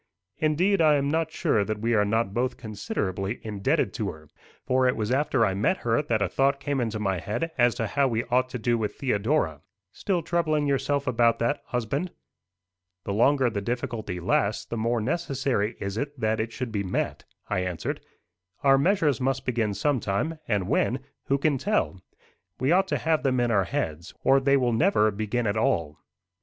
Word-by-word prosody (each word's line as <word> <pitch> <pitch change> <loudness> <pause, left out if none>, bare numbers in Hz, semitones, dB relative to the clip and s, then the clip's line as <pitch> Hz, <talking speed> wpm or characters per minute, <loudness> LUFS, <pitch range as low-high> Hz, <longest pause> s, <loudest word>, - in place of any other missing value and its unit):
"Indeed, 170 +6 +2
I 155 -2 +5
am 140 -1 +1
not 160 0 0
sure 105 - +1
that 110 +1 -3
we 115 +3 0
are 105 -2 +4
not 105 -1 0
both 125 +2 -1
considerably 100 -2 -3
indebted 105 -3 0
to - - -2
her; 75 -1 -11 0.4
for 130 0 +3
it 125 - +2
was 110 +1 -2
after 135 -3 +2
I 95 - 0
met 110 - +1
her 115 +3 +2
that 115 -8 0
a - - +1
thought 135 +6 +1
came 140 -1 -1
into 110 -2 -2
my 95 -3 -1
head 135 - -3
as 120 -1 +3
to 115 -2 -1
how 140 +5 +1
we 115 -2 0
ought 130 +1 +2
to 125 - -4
do 120 0 0
with 105 -2 -2
Theodora." 110 - 0 0.3
"Still 180 - -1
troubling 155 -3 +1
yourself 140 0 0
about 120 -2 +3
that, 120 +5 0
husband?" 125 +9 -2 0.9
"The 100 - -3
longer 130 +5 +3
the 100 -2 -2
difficulty 115 -4 -3
lasts, 100 +4 0
the - - -5
more 115 +1 0
necessary 135 -6 -1
is 100 +1 -4
it 145 -1 -4
that 110 0 0
it 110 +1 -2
should 125 0 -5
be 105 -2 -1
met," 95 -2 -2 0.2
I - - 0
answered. 90 -2 -3 0.6
"Our 135 -1 +5
measures 150 - +2
must 135 +1 0
begin 115 -5 0
sometime, 145 +4 -1
and 100 -5 0
when, 125 +4 +1 0.2
who 140 - +2
can 140 -1 +1
tell? 200 - 0 0.6
We 130 +4 +1
ought 190 +2 +4
to - - 0
have 160 -1 +1
them 130 -2 +1
in 120 -1 +1
our 100 -4 +3
heads, 80 +1 -4
or 135 +1 +5
they 140 +1 +3
will 125 -3 +1
never 115 - +3
begin 110 +4 -2
at 100 0 0
all." 85 - 0
120 Hz, 195 wpm, -26 LUFS, 105-140 Hz, 0.9 s, I